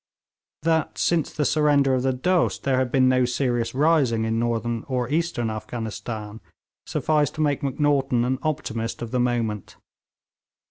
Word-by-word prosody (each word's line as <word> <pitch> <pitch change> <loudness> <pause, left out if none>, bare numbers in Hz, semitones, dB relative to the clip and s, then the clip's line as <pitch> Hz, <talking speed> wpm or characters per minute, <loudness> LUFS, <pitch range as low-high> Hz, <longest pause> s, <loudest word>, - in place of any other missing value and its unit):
That, 160 -1 +1
since 170 -3 +1
the 150 - -1
surrender 145 -3 +3
of 130 - +1
the 130 +1 +1
Dost, 175 +8 0
there 130 -2 +2
had 130 -2 -1
been 130 0 +4
no 130 0 +3
serious 120 -1 -1
rising 135 -7 +2
in 115 0 0
Northern 115 -1 -1
or 125 -3 -1
Eastern 150 -8 0
Afghanistan, 110 -1 -6 0.5
sufficed 150 -3 0
to 155 - -3
make 145 -2 +1
Macnaghten 135 -3 +1
an 130 +1 -1
optimist 115 -7 -3
of 115 - -6
the 125 - 0
moment. 115 -4 -1
130 Hz, 150 wpm, -24 LUFS, 115-145 Hz, 0.5 s, been